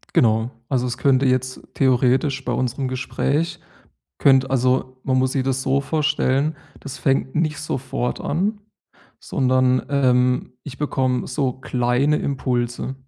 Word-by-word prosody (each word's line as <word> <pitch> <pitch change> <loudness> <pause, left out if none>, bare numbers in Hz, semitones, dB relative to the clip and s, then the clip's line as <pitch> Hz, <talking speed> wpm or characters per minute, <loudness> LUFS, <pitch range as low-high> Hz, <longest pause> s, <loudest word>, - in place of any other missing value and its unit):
Genau. 110 0 +3 0.2
Also, 125 -2 0
es 120 - -4
könnte 135 -1 +3
jetzt 130 0 0
theoretisch 130 +1 +2
bei - - -1
unserem 130 +1 -1
Gespräch 140 +5 -1 0.6
könnt 135 -1 +4
also, 130 0 0
man 130 -1 +1
muss 130 0 +1
sich 135 - 0
das 130 0 -1
so 135 +1 +1
vorstellen, 150 -1 0 0.2
das 140 - -8
fängt 135 -1 0
nicht 155 -2 0
sofort 130 -1 -3
an, 205 +7 -1 0.6
sondern, 130 -1 +1
ähm, 125 -3 +2
ich 135 -2 -9
bekomme 130 -4 0
so 130 -1 -1
kleine 130 +3 +1
Impulse, 125 -1 -2
130 Hz, 135 wpm, -21 LUFS, 125-140 Hz, 0.6 s, könnt